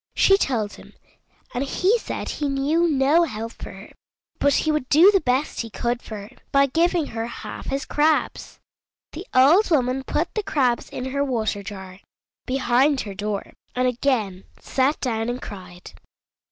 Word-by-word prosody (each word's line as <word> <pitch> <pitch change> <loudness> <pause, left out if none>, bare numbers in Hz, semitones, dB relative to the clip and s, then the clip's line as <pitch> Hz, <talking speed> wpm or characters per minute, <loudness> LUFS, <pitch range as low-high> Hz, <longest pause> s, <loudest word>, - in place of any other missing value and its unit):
She 390 - +5
told 230 - -1
him, - - -14 0.6
and 250 +1 -1
he 380 - +1
said - - -5
he 290 -2 -2
knew 290 +5 +1
no 290 +2 +3
help 225 -4 -5
for - - -10
her, 195 +2 -12 0.5
but 285 0 +3
he 315 - +1
would 300 -4 -2
do 340 +7 +7
the 390 -2 +2
best 265 +2 0
he 230 - -6
could 240 +2 -2
for 220 - -8
her 200 +1 -9 0.2
by 275 0 +5
giving 330 +3 +1
her 225 -3 -4
half - - -8
his 275 +1 -2
crabs. 305 +1 0 0.5
The 340 +5 -8
old 305 +12 +6
woman 265 -4 +1
put - - -2
the 430 - -1
crabs 260 -11 0
in 260 +1 -5
her 280 +1 0
water 220 -6 -1
jar, 190 -2 -9 0.5
behind 265 +2 +2
her 200 - -6
door, 205 0 -4 0.2
and 255 0 +2
again 230 -7 -1
sat 270 +3 0
down 225 -2 -1
and 245 +1 -3
cried. 180 -5 -10
260 Hz, 170 wpm, -23 LUFS, 225-295 Hz, 0.6 s, do